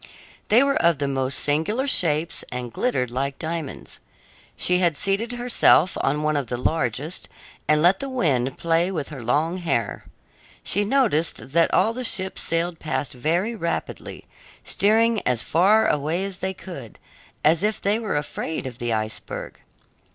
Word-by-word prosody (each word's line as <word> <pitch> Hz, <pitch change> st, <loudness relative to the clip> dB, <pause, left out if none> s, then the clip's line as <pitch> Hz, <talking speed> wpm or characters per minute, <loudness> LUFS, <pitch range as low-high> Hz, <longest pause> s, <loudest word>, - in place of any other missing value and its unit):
They 235 Hz, +5 st, +5 dB
were 275 Hz, 0 st, +1 dB
of 170 Hz, -2 st, +4 dB
the 140 Hz, 0 st, -1 dB
most 135 Hz, -1 st, -1 dB
singular 160 Hz, -, 0 dB
shapes 165 Hz, -, +2 dB
and 125 Hz, -1 st, -5 dB
glittered 125 Hz, -, -1 dB
like 135 Hz, +2 st, -2 dB
diamonds. 160 Hz, -3 st, -5 dB, 0.6 s
She 180 Hz, 0 st, +2 dB
had 170 Hz, -5 st, +1 dB
seated 205 Hz, +7 st, 0 dB
herself 240 Hz, -7 st, +4 dB
on 150 Hz, +2 st, 0 dB
one 155 Hz, 0 st, +1 dB
of 140 Hz, -4 st, -1 dB
the 120 Hz, -, -3 dB
largest 150 Hz, +3 st, -2 dB, 0.4 s
and 150 Hz, 0 st, +3 dB
let 185 Hz, +3 st, +5 dB
the 275 Hz, -, -4 dB
wind 135 Hz, -, 0 dB
play 170 Hz, +2 st, +1 dB
with 160 Hz, -7 st, -4 dB
her 145 Hz, -5 st, -8 dB
long 150 Hz, +9 st, 0 dB
hair. 120 Hz, -, -2 dB, 0.6 s
She 205 Hz, +2 st, +1 dB
noticed 200 Hz, -, +1 dB
that 165 Hz, +2 st, +3 dB
all 225 Hz, -, +3 dB
the 255 Hz, +2 st, -5 dB
ships 190 Hz, -5 st, 0 dB
sailed 165 Hz, 0 st, -1 dB
past 150 Hz, -2 st, -3 dB
very 170 Hz, -, 0 dB
rapidly, 170 Hz, -5 st, -4 dB, 0.4 s
steering 225 Hz, +2 st, +2 dB
as 125 Hz, -3 st, 0 dB
far 200 Hz, +7 st, +4 dB
away 155 Hz, +6 st, 0 dB
as 195 Hz, -2 st, -6 dB
they 190 Hz, 0 st, -3 dB
could, 170 Hz, -, -10 dB, 0.5 s
as 160 Hz, +2 st, +4 dB
if 210 Hz, +1 st, 0 dB
they 205 Hz, +3 st, +1 dB
were 215 Hz, -9 st, -2 dB
afraid 150 Hz, +1 st, -4 dB
of 125 Hz, -2 st, -7 dB
the 120 Hz, 0 st, -2 dB
iceberg. 110 Hz, -1 st, -4 dB
165 Hz, 160 wpm, -23 LUFS, 140-195 Hz, 0.6 s, They